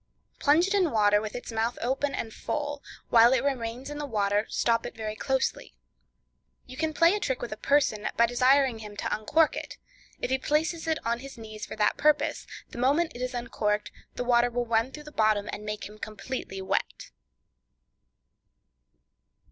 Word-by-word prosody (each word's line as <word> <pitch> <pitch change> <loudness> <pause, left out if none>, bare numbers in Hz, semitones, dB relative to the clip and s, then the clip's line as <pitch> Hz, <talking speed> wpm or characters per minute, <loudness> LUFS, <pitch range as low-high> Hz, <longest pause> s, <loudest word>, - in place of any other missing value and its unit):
Plunge 310 +4 +4
it 390 - -1
in 380 -5 +3
water 210 -3 +3
with 215 -1 -6
its 245 - -6
mouth 225 +2 -1
open 270 +4 -1
and 225 - -4
full; 290 -1 -3 0.3
while 235 +2 +7
it 260 -1 +2
remains 250 -2 -2
in 295 0 -6
the 295 - -3
water 205 -2 +1
stop 230 -1 +1
it - - -7
very 215 -1 -4
closely. 265 +4 -1 0.9
You 255 - -10
can 315 +3 -1
play 335 +3 +4
a 420 - 0
trick 260 -9 -1
with 240 - -5
a - - -3
person, 225 -4 +1
by 235 - +6
desiring 255 0 +3
him 210 -1 -9
to - - -1
uncork 300 +9 +2
it; - - -6 0.4
if - - -3
he 265 - +2
places 320 +4 0
it 320 -1 +1
on 235 +1 0
his 275 0 -10
knee 215 -1 -9
for - - -6
that 210 -1 +2
purpose, 295 -1 +2 0.2
the - - -7
moment 290 +7 +2
it 245 - -8
is 250 0 -3
uncorked 210 -3 -1 0.2
the - - -2
water 240 0 +3
will 245 0 -2
run 230 +2 +1
through 300 +2 -9
the 300 - -11
bottom, 215 -4 +2
and 210 - -6
make 210 0 -4
him 210 +1 -14
completely 215 -3 -5
wet. - - -2
245 Hz, 190 wpm, -28 LUFS, 215-285 Hz, 0.9 s, while